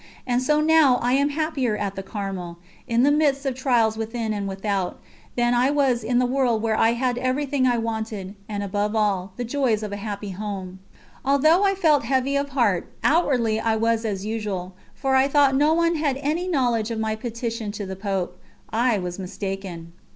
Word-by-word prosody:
And 245 Hz, -1 st, +1 dB
so 300 Hz, +4 st, +2 dB
now 310 Hz, -5 st, +5 dB
I 245 Hz, +1 st, +2 dB
am 280 Hz, +2 st, +3 dB
happier 285 Hz, -7 st, -1 dB
at 200 Hz, -2 st, -2 dB
the 195 Hz, -, -4 dB
Carmel, 190 Hz, -4 st, -5 dB, 0.3 s
in 235 Hz, 0 st, +2 dB
the 285 Hz, -, +5 dB
midst 290 Hz, -2 st, +2 dB
of 270 Hz, -, 0 dB
trials 240 Hz, -4 st, +1 dB
within 225 Hz, 0 st, -3 dB
and 200 Hz, -1 st, -3 dB
without, 195 Hz, -1 st, -2 dB, 0.4 s
than 240 Hz, 0 st, +2 dB
I 245 Hz, +2 st, +3 dB
was 270 Hz, -5 st, +1 dB
in 240 Hz, +2 st, +1 dB
the 250 Hz, -, +3 dB
world 245 Hz, -3 st, +1 dB
where 220 Hz, -1 st, +1 dB
I 225 Hz, +1 st, +3 dB
had 245 Hz, 0 st, -1 dB
everything 260 Hz, +1 st, 0 dB
I 245 Hz, -1 st, +2 dB
wanted, 220 Hz, -4 st, -4 dB, 0.2 s
and, 205 Hz, -1 st, -3 dB
above 205 Hz, +2 st, -1 dB
all, 200 Hz, -3 st, 0 dB
the 245 Hz, -, -2 dB
joys 240 Hz, -3 st, 0 dB
of 210 Hz, -, -4 dB
a 205 Hz, -, -4 dB
happy 205 Hz, -1 st, -5 dB
home. 190 Hz, -1 st, -6 dB, 0.4 s
Although 310 Hz, +7 st, +4 dB
I 395 Hz, -1 st, +3 dB
felt 310 Hz, -9 st, +3 dB
heavy 265 Hz, +2 st, +1 dB
of 280 Hz, 0 st, 0 dB
heart, 235 Hz, -10 st, 0 dB
outwardly 250 Hz, -9 st, +2 dB
I 225 Hz, 0 st, +1 dB
was 225 Hz, +1 st, +1 dB
as 200 Hz, -3 st, -3 dB
usual, 205 Hz, -4 st, -3 dB, 0.2 s
for 270 Hz, -1 st, 0 dB
I 265 Hz, +1 st, +4 dB
thought 280 Hz, -1 st, +4 dB
no 295 Hz, +4 st, +3 dB
one 335 Hz, 0 st, +2 dB
had 290 Hz, -4 st, 0 dB
any 305 Hz, +6 st, -1 dB
knowledge 240 Hz, -9 st, +1 dB
of 230 Hz, -, -3 dB
my 220 Hz, 0 st, -1 dB
petition 230 Hz, -1 st, -4 dB
to 205 Hz, -1 st, -5 dB
the 190 Hz, 0 st, -5 dB
Pope. 195 Hz, -2 st, -3 dB, 0.3 s
I 235 Hz, 0 st, +2 dB
was 180 Hz, -1 st, -5 dB
mistaken. 185 Hz, -3 st, -6 dB
230 Hz, 195 wpm, -23 LUFS, 205-270 Hz, 0.4 s, now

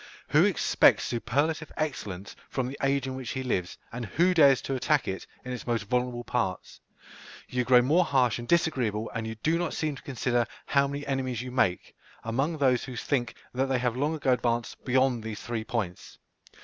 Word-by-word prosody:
Who -, -, +5 dB
expects -, -, +4 dB
superlative 145 Hz, +7 st, -1 dB
excellence 105 Hz, -, -4 dB
from 130 Hz, -2 st, -1 dB
the 135 Hz, -, -6 dB
age 135 Hz, 0 st, +1 dB
in 130 Hz, -, -4 dB
which 130 Hz, -2 st, -6 dB
he 130 Hz, -, -3 dB
lives, 90 Hz, -8 st, -2 dB
and 125 Hz, +1 st, -5 dB
who 175 Hz, -, +2 dB
dares 140 Hz, -6 st, +6 dB
to 135 Hz, -, -2 dB
attack 145 Hz, +3 st, +1 dB
it, 95 Hz, 0 st, -4 dB, 0.2 s
in 125 Hz, -, -5 dB
its 125 Hz, -, -7 dB
most 115 Hz, -3 st, 0 dB
vulnerable 125 Hz, +2 st, -1 dB
parts? 95 Hz, -7 st, -2 dB, 0.7 s
You 125 Hz, 0 st, -1 dB
grow 125 Hz, 0 st, +6 dB
more 160 Hz, +8 st, +4 dB
harsh 130 Hz, -8 st, +2 dB
and 120 Hz, -, -7 dB
disagreeable, 125 Hz, -10 st, +1 dB
and 115 Hz, -1 st, -3 dB
you 110 Hz, -, -5 dB
do 160 Hz, +9 st, 0 dB
not 175 Hz, -2 st, -2 dB
seem 155 Hz, -2 st, -1 dB
to -, -, -11 dB
consider 120 Hz, -3 st, 0 dB, 0.2 s
how 140 Hz, 0 st, +3 dB
many 140 Hz, +1 st, -5 dB
enemies 130 Hz, -3 st, -2 dB
you 125 Hz, -, -6 dB
make, 95 Hz, -8 st, 0 dB, 0.3 s
among 135 Hz, +8 st, -1 dB
those 130 Hz, -4 st, +2 dB
who 130 Hz, -, -7 dB
think 120 Hz, 0 st, -1 dB, 0.2 s
that 130 Hz, +2 st, 0 dB
they 135 Hz, -1 st, +1 dB
have 125 Hz, -1 st, 0 dB
long 145 Hz, +5 st, 0 dB
ago 135 Hz, -4 st, +2 dB
advanced 120 Hz, -2 st, -1 dB
beyond 130 Hz, -2 st, +2 dB
these 110 Hz, -1 st, -5 dB
three 115 Hz, -2 st, -3 dB
points. 110 Hz, -6 st, -4 dB
125 Hz, 195 wpm, -28 LUFS, 120-140 Hz, 0.7 s, dares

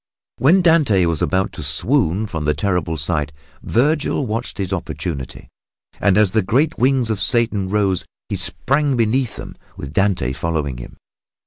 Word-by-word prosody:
When 180 Hz, +8 st, +4 dB
Dante 145 Hz, -, +4 dB
was 85 Hz, -3 st, -1 dB
about 95 Hz, +2 st, 0 dB
to -, -, -8 dB
swoon 95 Hz, -, +1 dB
from 80 Hz, -7 st, -4 dB
the 75 Hz, -, +1 dB
terrible 90 Hz, -5 st, -1 dB
sight, 75 Hz, -1 st, -1 dB, 0.3 s
Vergil 145 Hz, +3 st, +1 dB
watched 115 Hz, +1 st, -3 dB
his 95 Hz, -1 st, -3 dB
opportunity, 80 Hz, -6 st, -5 dB, 0.5 s
and 100 Hz, -1 st, +3 dB
as 105 Hz, -3 st, +4 dB
the 110 Hz, -, +2 dB
great 140 Hz, -, 0 dB
wings 130 Hz, -2 st, +2 dB
of 105 Hz, -, -2 dB
Satan 110 Hz, -6 st, +2 dB
rose 100 Hz, -3 st, +1 dB, 0.2 s
he -, -, -3 dB
sprang 140 Hz, 0 st, 0 dB
beneath 115 Hz, +1 st, +1 dB
them, -, -, -9 dB, 0.2 s
with 70 Hz, 0 st, -7 dB
Dante 95 Hz, -10 st, +1 dB
following 75 Hz, -4 st, -2 dB
him. -, -, -11 dB
100 Hz, 155 wpm, -19 LUFS, 85-125 Hz, 0.5 s, When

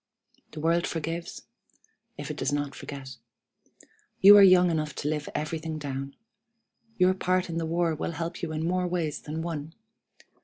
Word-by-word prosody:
The 155 Hz, -, -7 dB
world 170 Hz, +2 st, +1 dB
forgives, 165 Hz, +1 st, -4 dB, 0.7 s
if -, -, -5 dB
it -, -, -7 dB
does -, -, -1 dB
not 145 Hz, -1 st, -2 dB
forget. 135 Hz, -3 st, -8 dB, 1.0 s
You 200 Hz, +2 st, +10 dB
are 205 Hz, -, +9 dB
young 180 Hz, -2 st, +7 dB
enough 155 Hz, -3 st, -2 dB
to -, -, -4 dB
live 150 Hz, -1 st, -2 dB
everything 155 Hz, +1 st, -3 dB
down. 140 Hz, -2 st, -5 dB, 0.8 s
Your 185 Hz, 0 st, +4 dB
part 185 Hz, -1 st, 0 dB
in 165 Hz, -, -3 dB
the 165 Hz, -, -2 dB
war 170 Hz, 0 st, +1 dB
will 155 Hz, +2 st, -3 dB
help 165 Hz, +1 st, -5 dB
you 170 Hz, -3 st, -3 dB
in 155 Hz, +1 st, -2 dB
more 180 Hz, +1 st, 0 dB
ways 170 Hz, -4 st, -2 dB
than 160 Hz, +2 st, -5 dB
one. 160 Hz, -1 st, -5 dB
160 Hz, 165 wpm, -27 LUFS, 150-175 Hz, 1.0 s, You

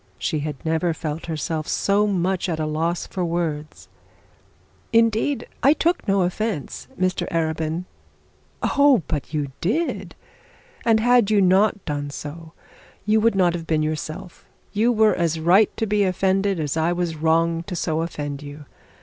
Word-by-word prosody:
She 155 Hz, -, -1 dB
had 150 Hz, 0 st, -3 dB
never 160 Hz, +1 st, 0 dB
felt 160 Hz, 0 st, -5 dB
herself 155 Hz, -1 st, -3 dB
so 205 Hz, +1 st, +2 dB
much 190 Hz, -1 st, 0 dB
at 160 Hz, -2 st, -2 dB
a 155 Hz, -, 0 dB
loss 165 Hz, +3 st, -1 dB
for 185 Hz, -, -4 dB
words. 165 Hz, -3 st, -3 dB, 1.0 s
'Indeed 230 Hz, +4 st, +2 dB, 0.2 s
I 280 Hz, -, +6 dB
took 340 Hz, -3 st, 0 dB
no 195 Hz, -1 st, +3 dB
offence, 180 Hz, -2 st, -3 dB
Mr 185 Hz, 0 st, 0 dB
Arabin.' 160 Hz, +1 st, -1 dB, 0.8 s
'Oh, 280 Hz, -, +4 dB
but 150 Hz, -3 st, -3 dB
you 150 Hz, -3 st, -2 dB
did! 310 Hz, -, -1 dB, 0.7 s
And 225 Hz, -1 st, +4 dB
had 240 Hz, -2 st, +4 dB
you 210 Hz, -1 st, +4 dB
not 195 Hz, +2 st, +3 dB
done 145 Hz, -1 st, -3 dB
so, 160 Hz, +3 st, -8 dB, 0.5 s
you 215 Hz, +1 st, +3 dB
would 230 Hz, -1 st, +3 dB
not 180 Hz, -3 st, +3 dB
have 165 Hz, -2 st, -5 dB
been 155 Hz, -1 st, +1 dB
yourself. 155 Hz, +4 st, -5 dB, 0.3 s
You 220 Hz, +4 st, +3 dB
were 220 Hz, -2 st, +4 dB
as 165 Hz, -2 st, 0 dB
right 185 Hz, +6 st, +5 dB
to 225 Hz, -, 0 dB
be 210 Hz, -1 st, +2 dB
offended, 190 Hz, 0 st, +1 dB
as 150 Hz, -2 st, -2 dB
I 160 Hz, +1 st, +1 dB
was 175 Hz, -2 st, -1 dB
wrong 165 Hz, +1 st, +1 dB
to 185 Hz, -, -4 dB
so 160 Hz, -1 st, -1 dB
offend 145 Hz, -4 st, -4 dB
you. 145 Hz, +1 st, -10 dB
175 Hz, 160 wpm, -23 LUFS, 160-205 Hz, 1.0 s, I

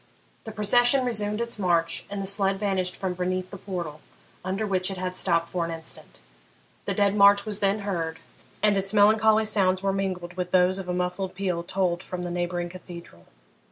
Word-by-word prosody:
The 220 Hz, -, -6 dB
procession 245 Hz, +5 st, +3 dB
resumed 210 Hz, -2 st, -1 dB
its 235 Hz, -2 st, -3 dB
march, 170 Hz, -3 st, +1 dB
and 200 Hz, 0 st, -5 dB
the 195 Hz, -, -3 dB
sledge 195 Hz, 0 st, +3 dB
vanished 190 Hz, -3 st, -1 dB
from 190 Hz, -2 st, -3 dB
beneath 185 Hz, +1 st, -3 dB
the 200 Hz, -, -7 dB
portal, 170 Hz, -6 st, -6 dB, 0.4 s
under 190 Hz, +4 st, -2 dB
which 185 Hz, -2 st, 0 dB
it 195 Hz, -, -5 dB
had 185 Hz, 0 st, -3 dB
stopped 170 Hz, -2 st, +1 dB
for 175 Hz, -2 st, -2 dB
an 165 Hz, -, -3 dB
instant. 165 Hz, -1 st, -4 dB, 0.7 s
The -, -, -2 dB
dead 205 Hz, -1 st, +2 dB
march 200 Hz, 0 st, +6 dB
was 210 Hz, -2 st, 0 dB
then 200 Hz, +1 st, +1 dB
heard, 170 Hz, -5 st, -3 dB, 0.5 s
and 210 Hz, -1 st, +4 dB
its 195 Hz, +2 st, -2 dB
melancholy 220 Hz, +1 st, +5 dB
sounds 190 Hz, -3 st, +1 dB
were 195 Hz, 0 st, +1 dB
mingled 185 Hz, -2 st, -3 dB
with 180 Hz, -1 st, -4 dB
those 185 Hz, +1 st, +3 dB
of 185 Hz, -2 st, -7 dB
a -, -, +1 dB
muffled 180 Hz, +1 st, -3 dB
peal 185 Hz, -3 st, -2 dB
tolled 175 Hz, 0 st, -1 dB
from 180 Hz, -1 st, -6 dB
the 175 Hz, -, -4 dB
neighbouring 175 Hz, 0 st, -2 dB
cathedral. 170 Hz, -, -12 dB
190 Hz, 190 wpm, -25 LUFS, 180-205 Hz, 0.7 s, march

